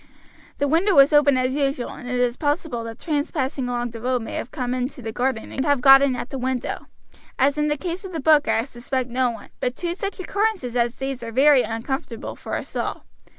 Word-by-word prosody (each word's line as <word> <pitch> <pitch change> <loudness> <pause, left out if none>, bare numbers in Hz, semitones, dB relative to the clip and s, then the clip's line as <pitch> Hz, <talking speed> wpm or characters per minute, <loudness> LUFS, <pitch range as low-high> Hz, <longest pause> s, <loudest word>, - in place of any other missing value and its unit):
The 285 - +1
window 340 +6 +3
was 275 +2 +7
open 290 -2 +5
as 255 0 +1
usual, 275 -3 -1
and 245 - -9
it 250 0 -1
is 245 -1 +1
possible 290 -5 -1
that 225 0 -7
tramps 295 -2 -1
passing 265 -3 -2
along 240 -1 -2
the 230 -1 -9
road 250 -1 0
may - - -7
have - - -4
come 250 -4 -3
into 255 +2 -3
the 225 -2 -5
garden 245 -1 -2
and 265 - -2
have 285 -1 +2
got 270 +1 +8
in 275 -2 +2
at 240 - -6
the 270 - -4
window. 255 -1 -3 0.5
As 275 +2 +3
in 300 0 +1
the 295 0 0
case 350 +5 -4
of 380 - -7
the 330 - -4
book 300 +1 +4
I 225 0 +2
suspect 250 0 -4
no 255 0 +2
one, 225 -3 -9
but 250 0 -1
two 345 -1 -2
such 395 +2 -5
occurrences 385 - -1
as 235 0 +1
these 270 -1 -4
are 230 -1 -6
very 275 +2 +6
uncomfortable 230 +2 -4
for - - -5
us - - -6
all. - - -3
265 Hz, 235 wpm, -23 LUFS, 245-295 Hz, 0.5 s, got